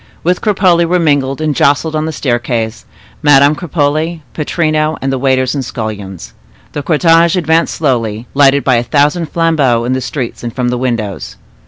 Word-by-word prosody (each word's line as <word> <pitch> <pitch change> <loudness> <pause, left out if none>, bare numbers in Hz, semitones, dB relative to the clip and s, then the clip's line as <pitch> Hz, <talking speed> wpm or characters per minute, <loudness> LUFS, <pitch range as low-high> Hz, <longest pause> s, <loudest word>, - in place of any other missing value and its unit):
With 180 +2 0
Cropole 185 -5 +2
were 180 +2 +2
mingled, 145 -4 0
and 155 -2 -1
jostled, 145 +4 +1
on 155 0 -1
the - - -2
staircase, 120 -5 -2 0.4
Madame 145 -1 +5
Cropole, 160 0 -1
Pittrino, 155 -1 -1
and 135 0 -2
the 130 - -2
waiters 130 -1 +1
and 140 -2 -2
scullions. 100 - -6 0.4
The 145 - -4
cortege 165 +2 +3
advanced 165 -1 +1
slowly, 115 -7 -1
lighted 140 0 +4
by 130 -3 +2
a 120 - 0
thousand 150 +6 +1
flambeaux, 150 -8 +1
in 125 - 0
the 130 - -2
streets 130 -1 -5
and 120 -1 -5
from 125 -2 -1
the 125 - -1
windows. 115 -6 -3
140 Hz, 170 wpm, -13 LUFS, 125-160 Hz, 0.4 s, Madame